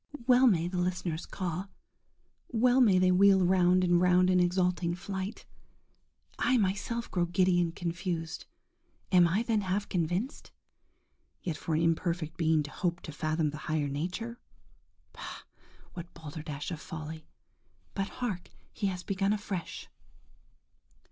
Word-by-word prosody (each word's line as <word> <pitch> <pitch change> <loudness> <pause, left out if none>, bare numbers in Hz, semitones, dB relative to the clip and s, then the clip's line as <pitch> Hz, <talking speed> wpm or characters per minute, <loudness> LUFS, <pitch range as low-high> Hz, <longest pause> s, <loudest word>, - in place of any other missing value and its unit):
–Well 255 +1 +6
may 175 -7 +3
the 180 0 -2
listeners 180 -2 -2
caw! 185 0 -4 0.8
well 250 +2 +3
may 205 -7 +5
they 185 0 +4
wheel 190 0 +5
round 180 0 +4
and 175 -1 +3
round 180 0 +4
in 180 - +4
exulting 180 -1 +1
flight. 190 +2 -5 0.9
I 255 - +3
myself 210 +3 -1
grow 175 -2 +1
giddy 175 0 +3
and 170 -1 -1
confused. 170 -1 -4 0.6
Am 180 -2 +6
I 190 +7 +1
then 225 -3 +1
half 200 +2 -1
convinced?–Yet 180 - -5
for 160 - -2
an 160 - +2
imperfect 165 -1 0
being 160 -2 +2
to 145 - -8
hope 175 0 -2
to 155 - -7
fathom 155 0 -1
the 150 - -7
higher 155 -2 +1
nature? 180 +12 -4 0.7
Bah! - - -8 0.5
what 170 0 -8
balderdash 150 -1 -6
of 160 -3 -5
folly! 155 0 -7 0.7
But 195 - -1
hark, 205 -8 -4 0.2
he 200 - -1
has 180 -2 -3
begun 195 +2 0
afresh. 200 -4 -5
180 Hz, 135 wpm, -30 LUFS, 165-195 Hz, 0.9 s, Well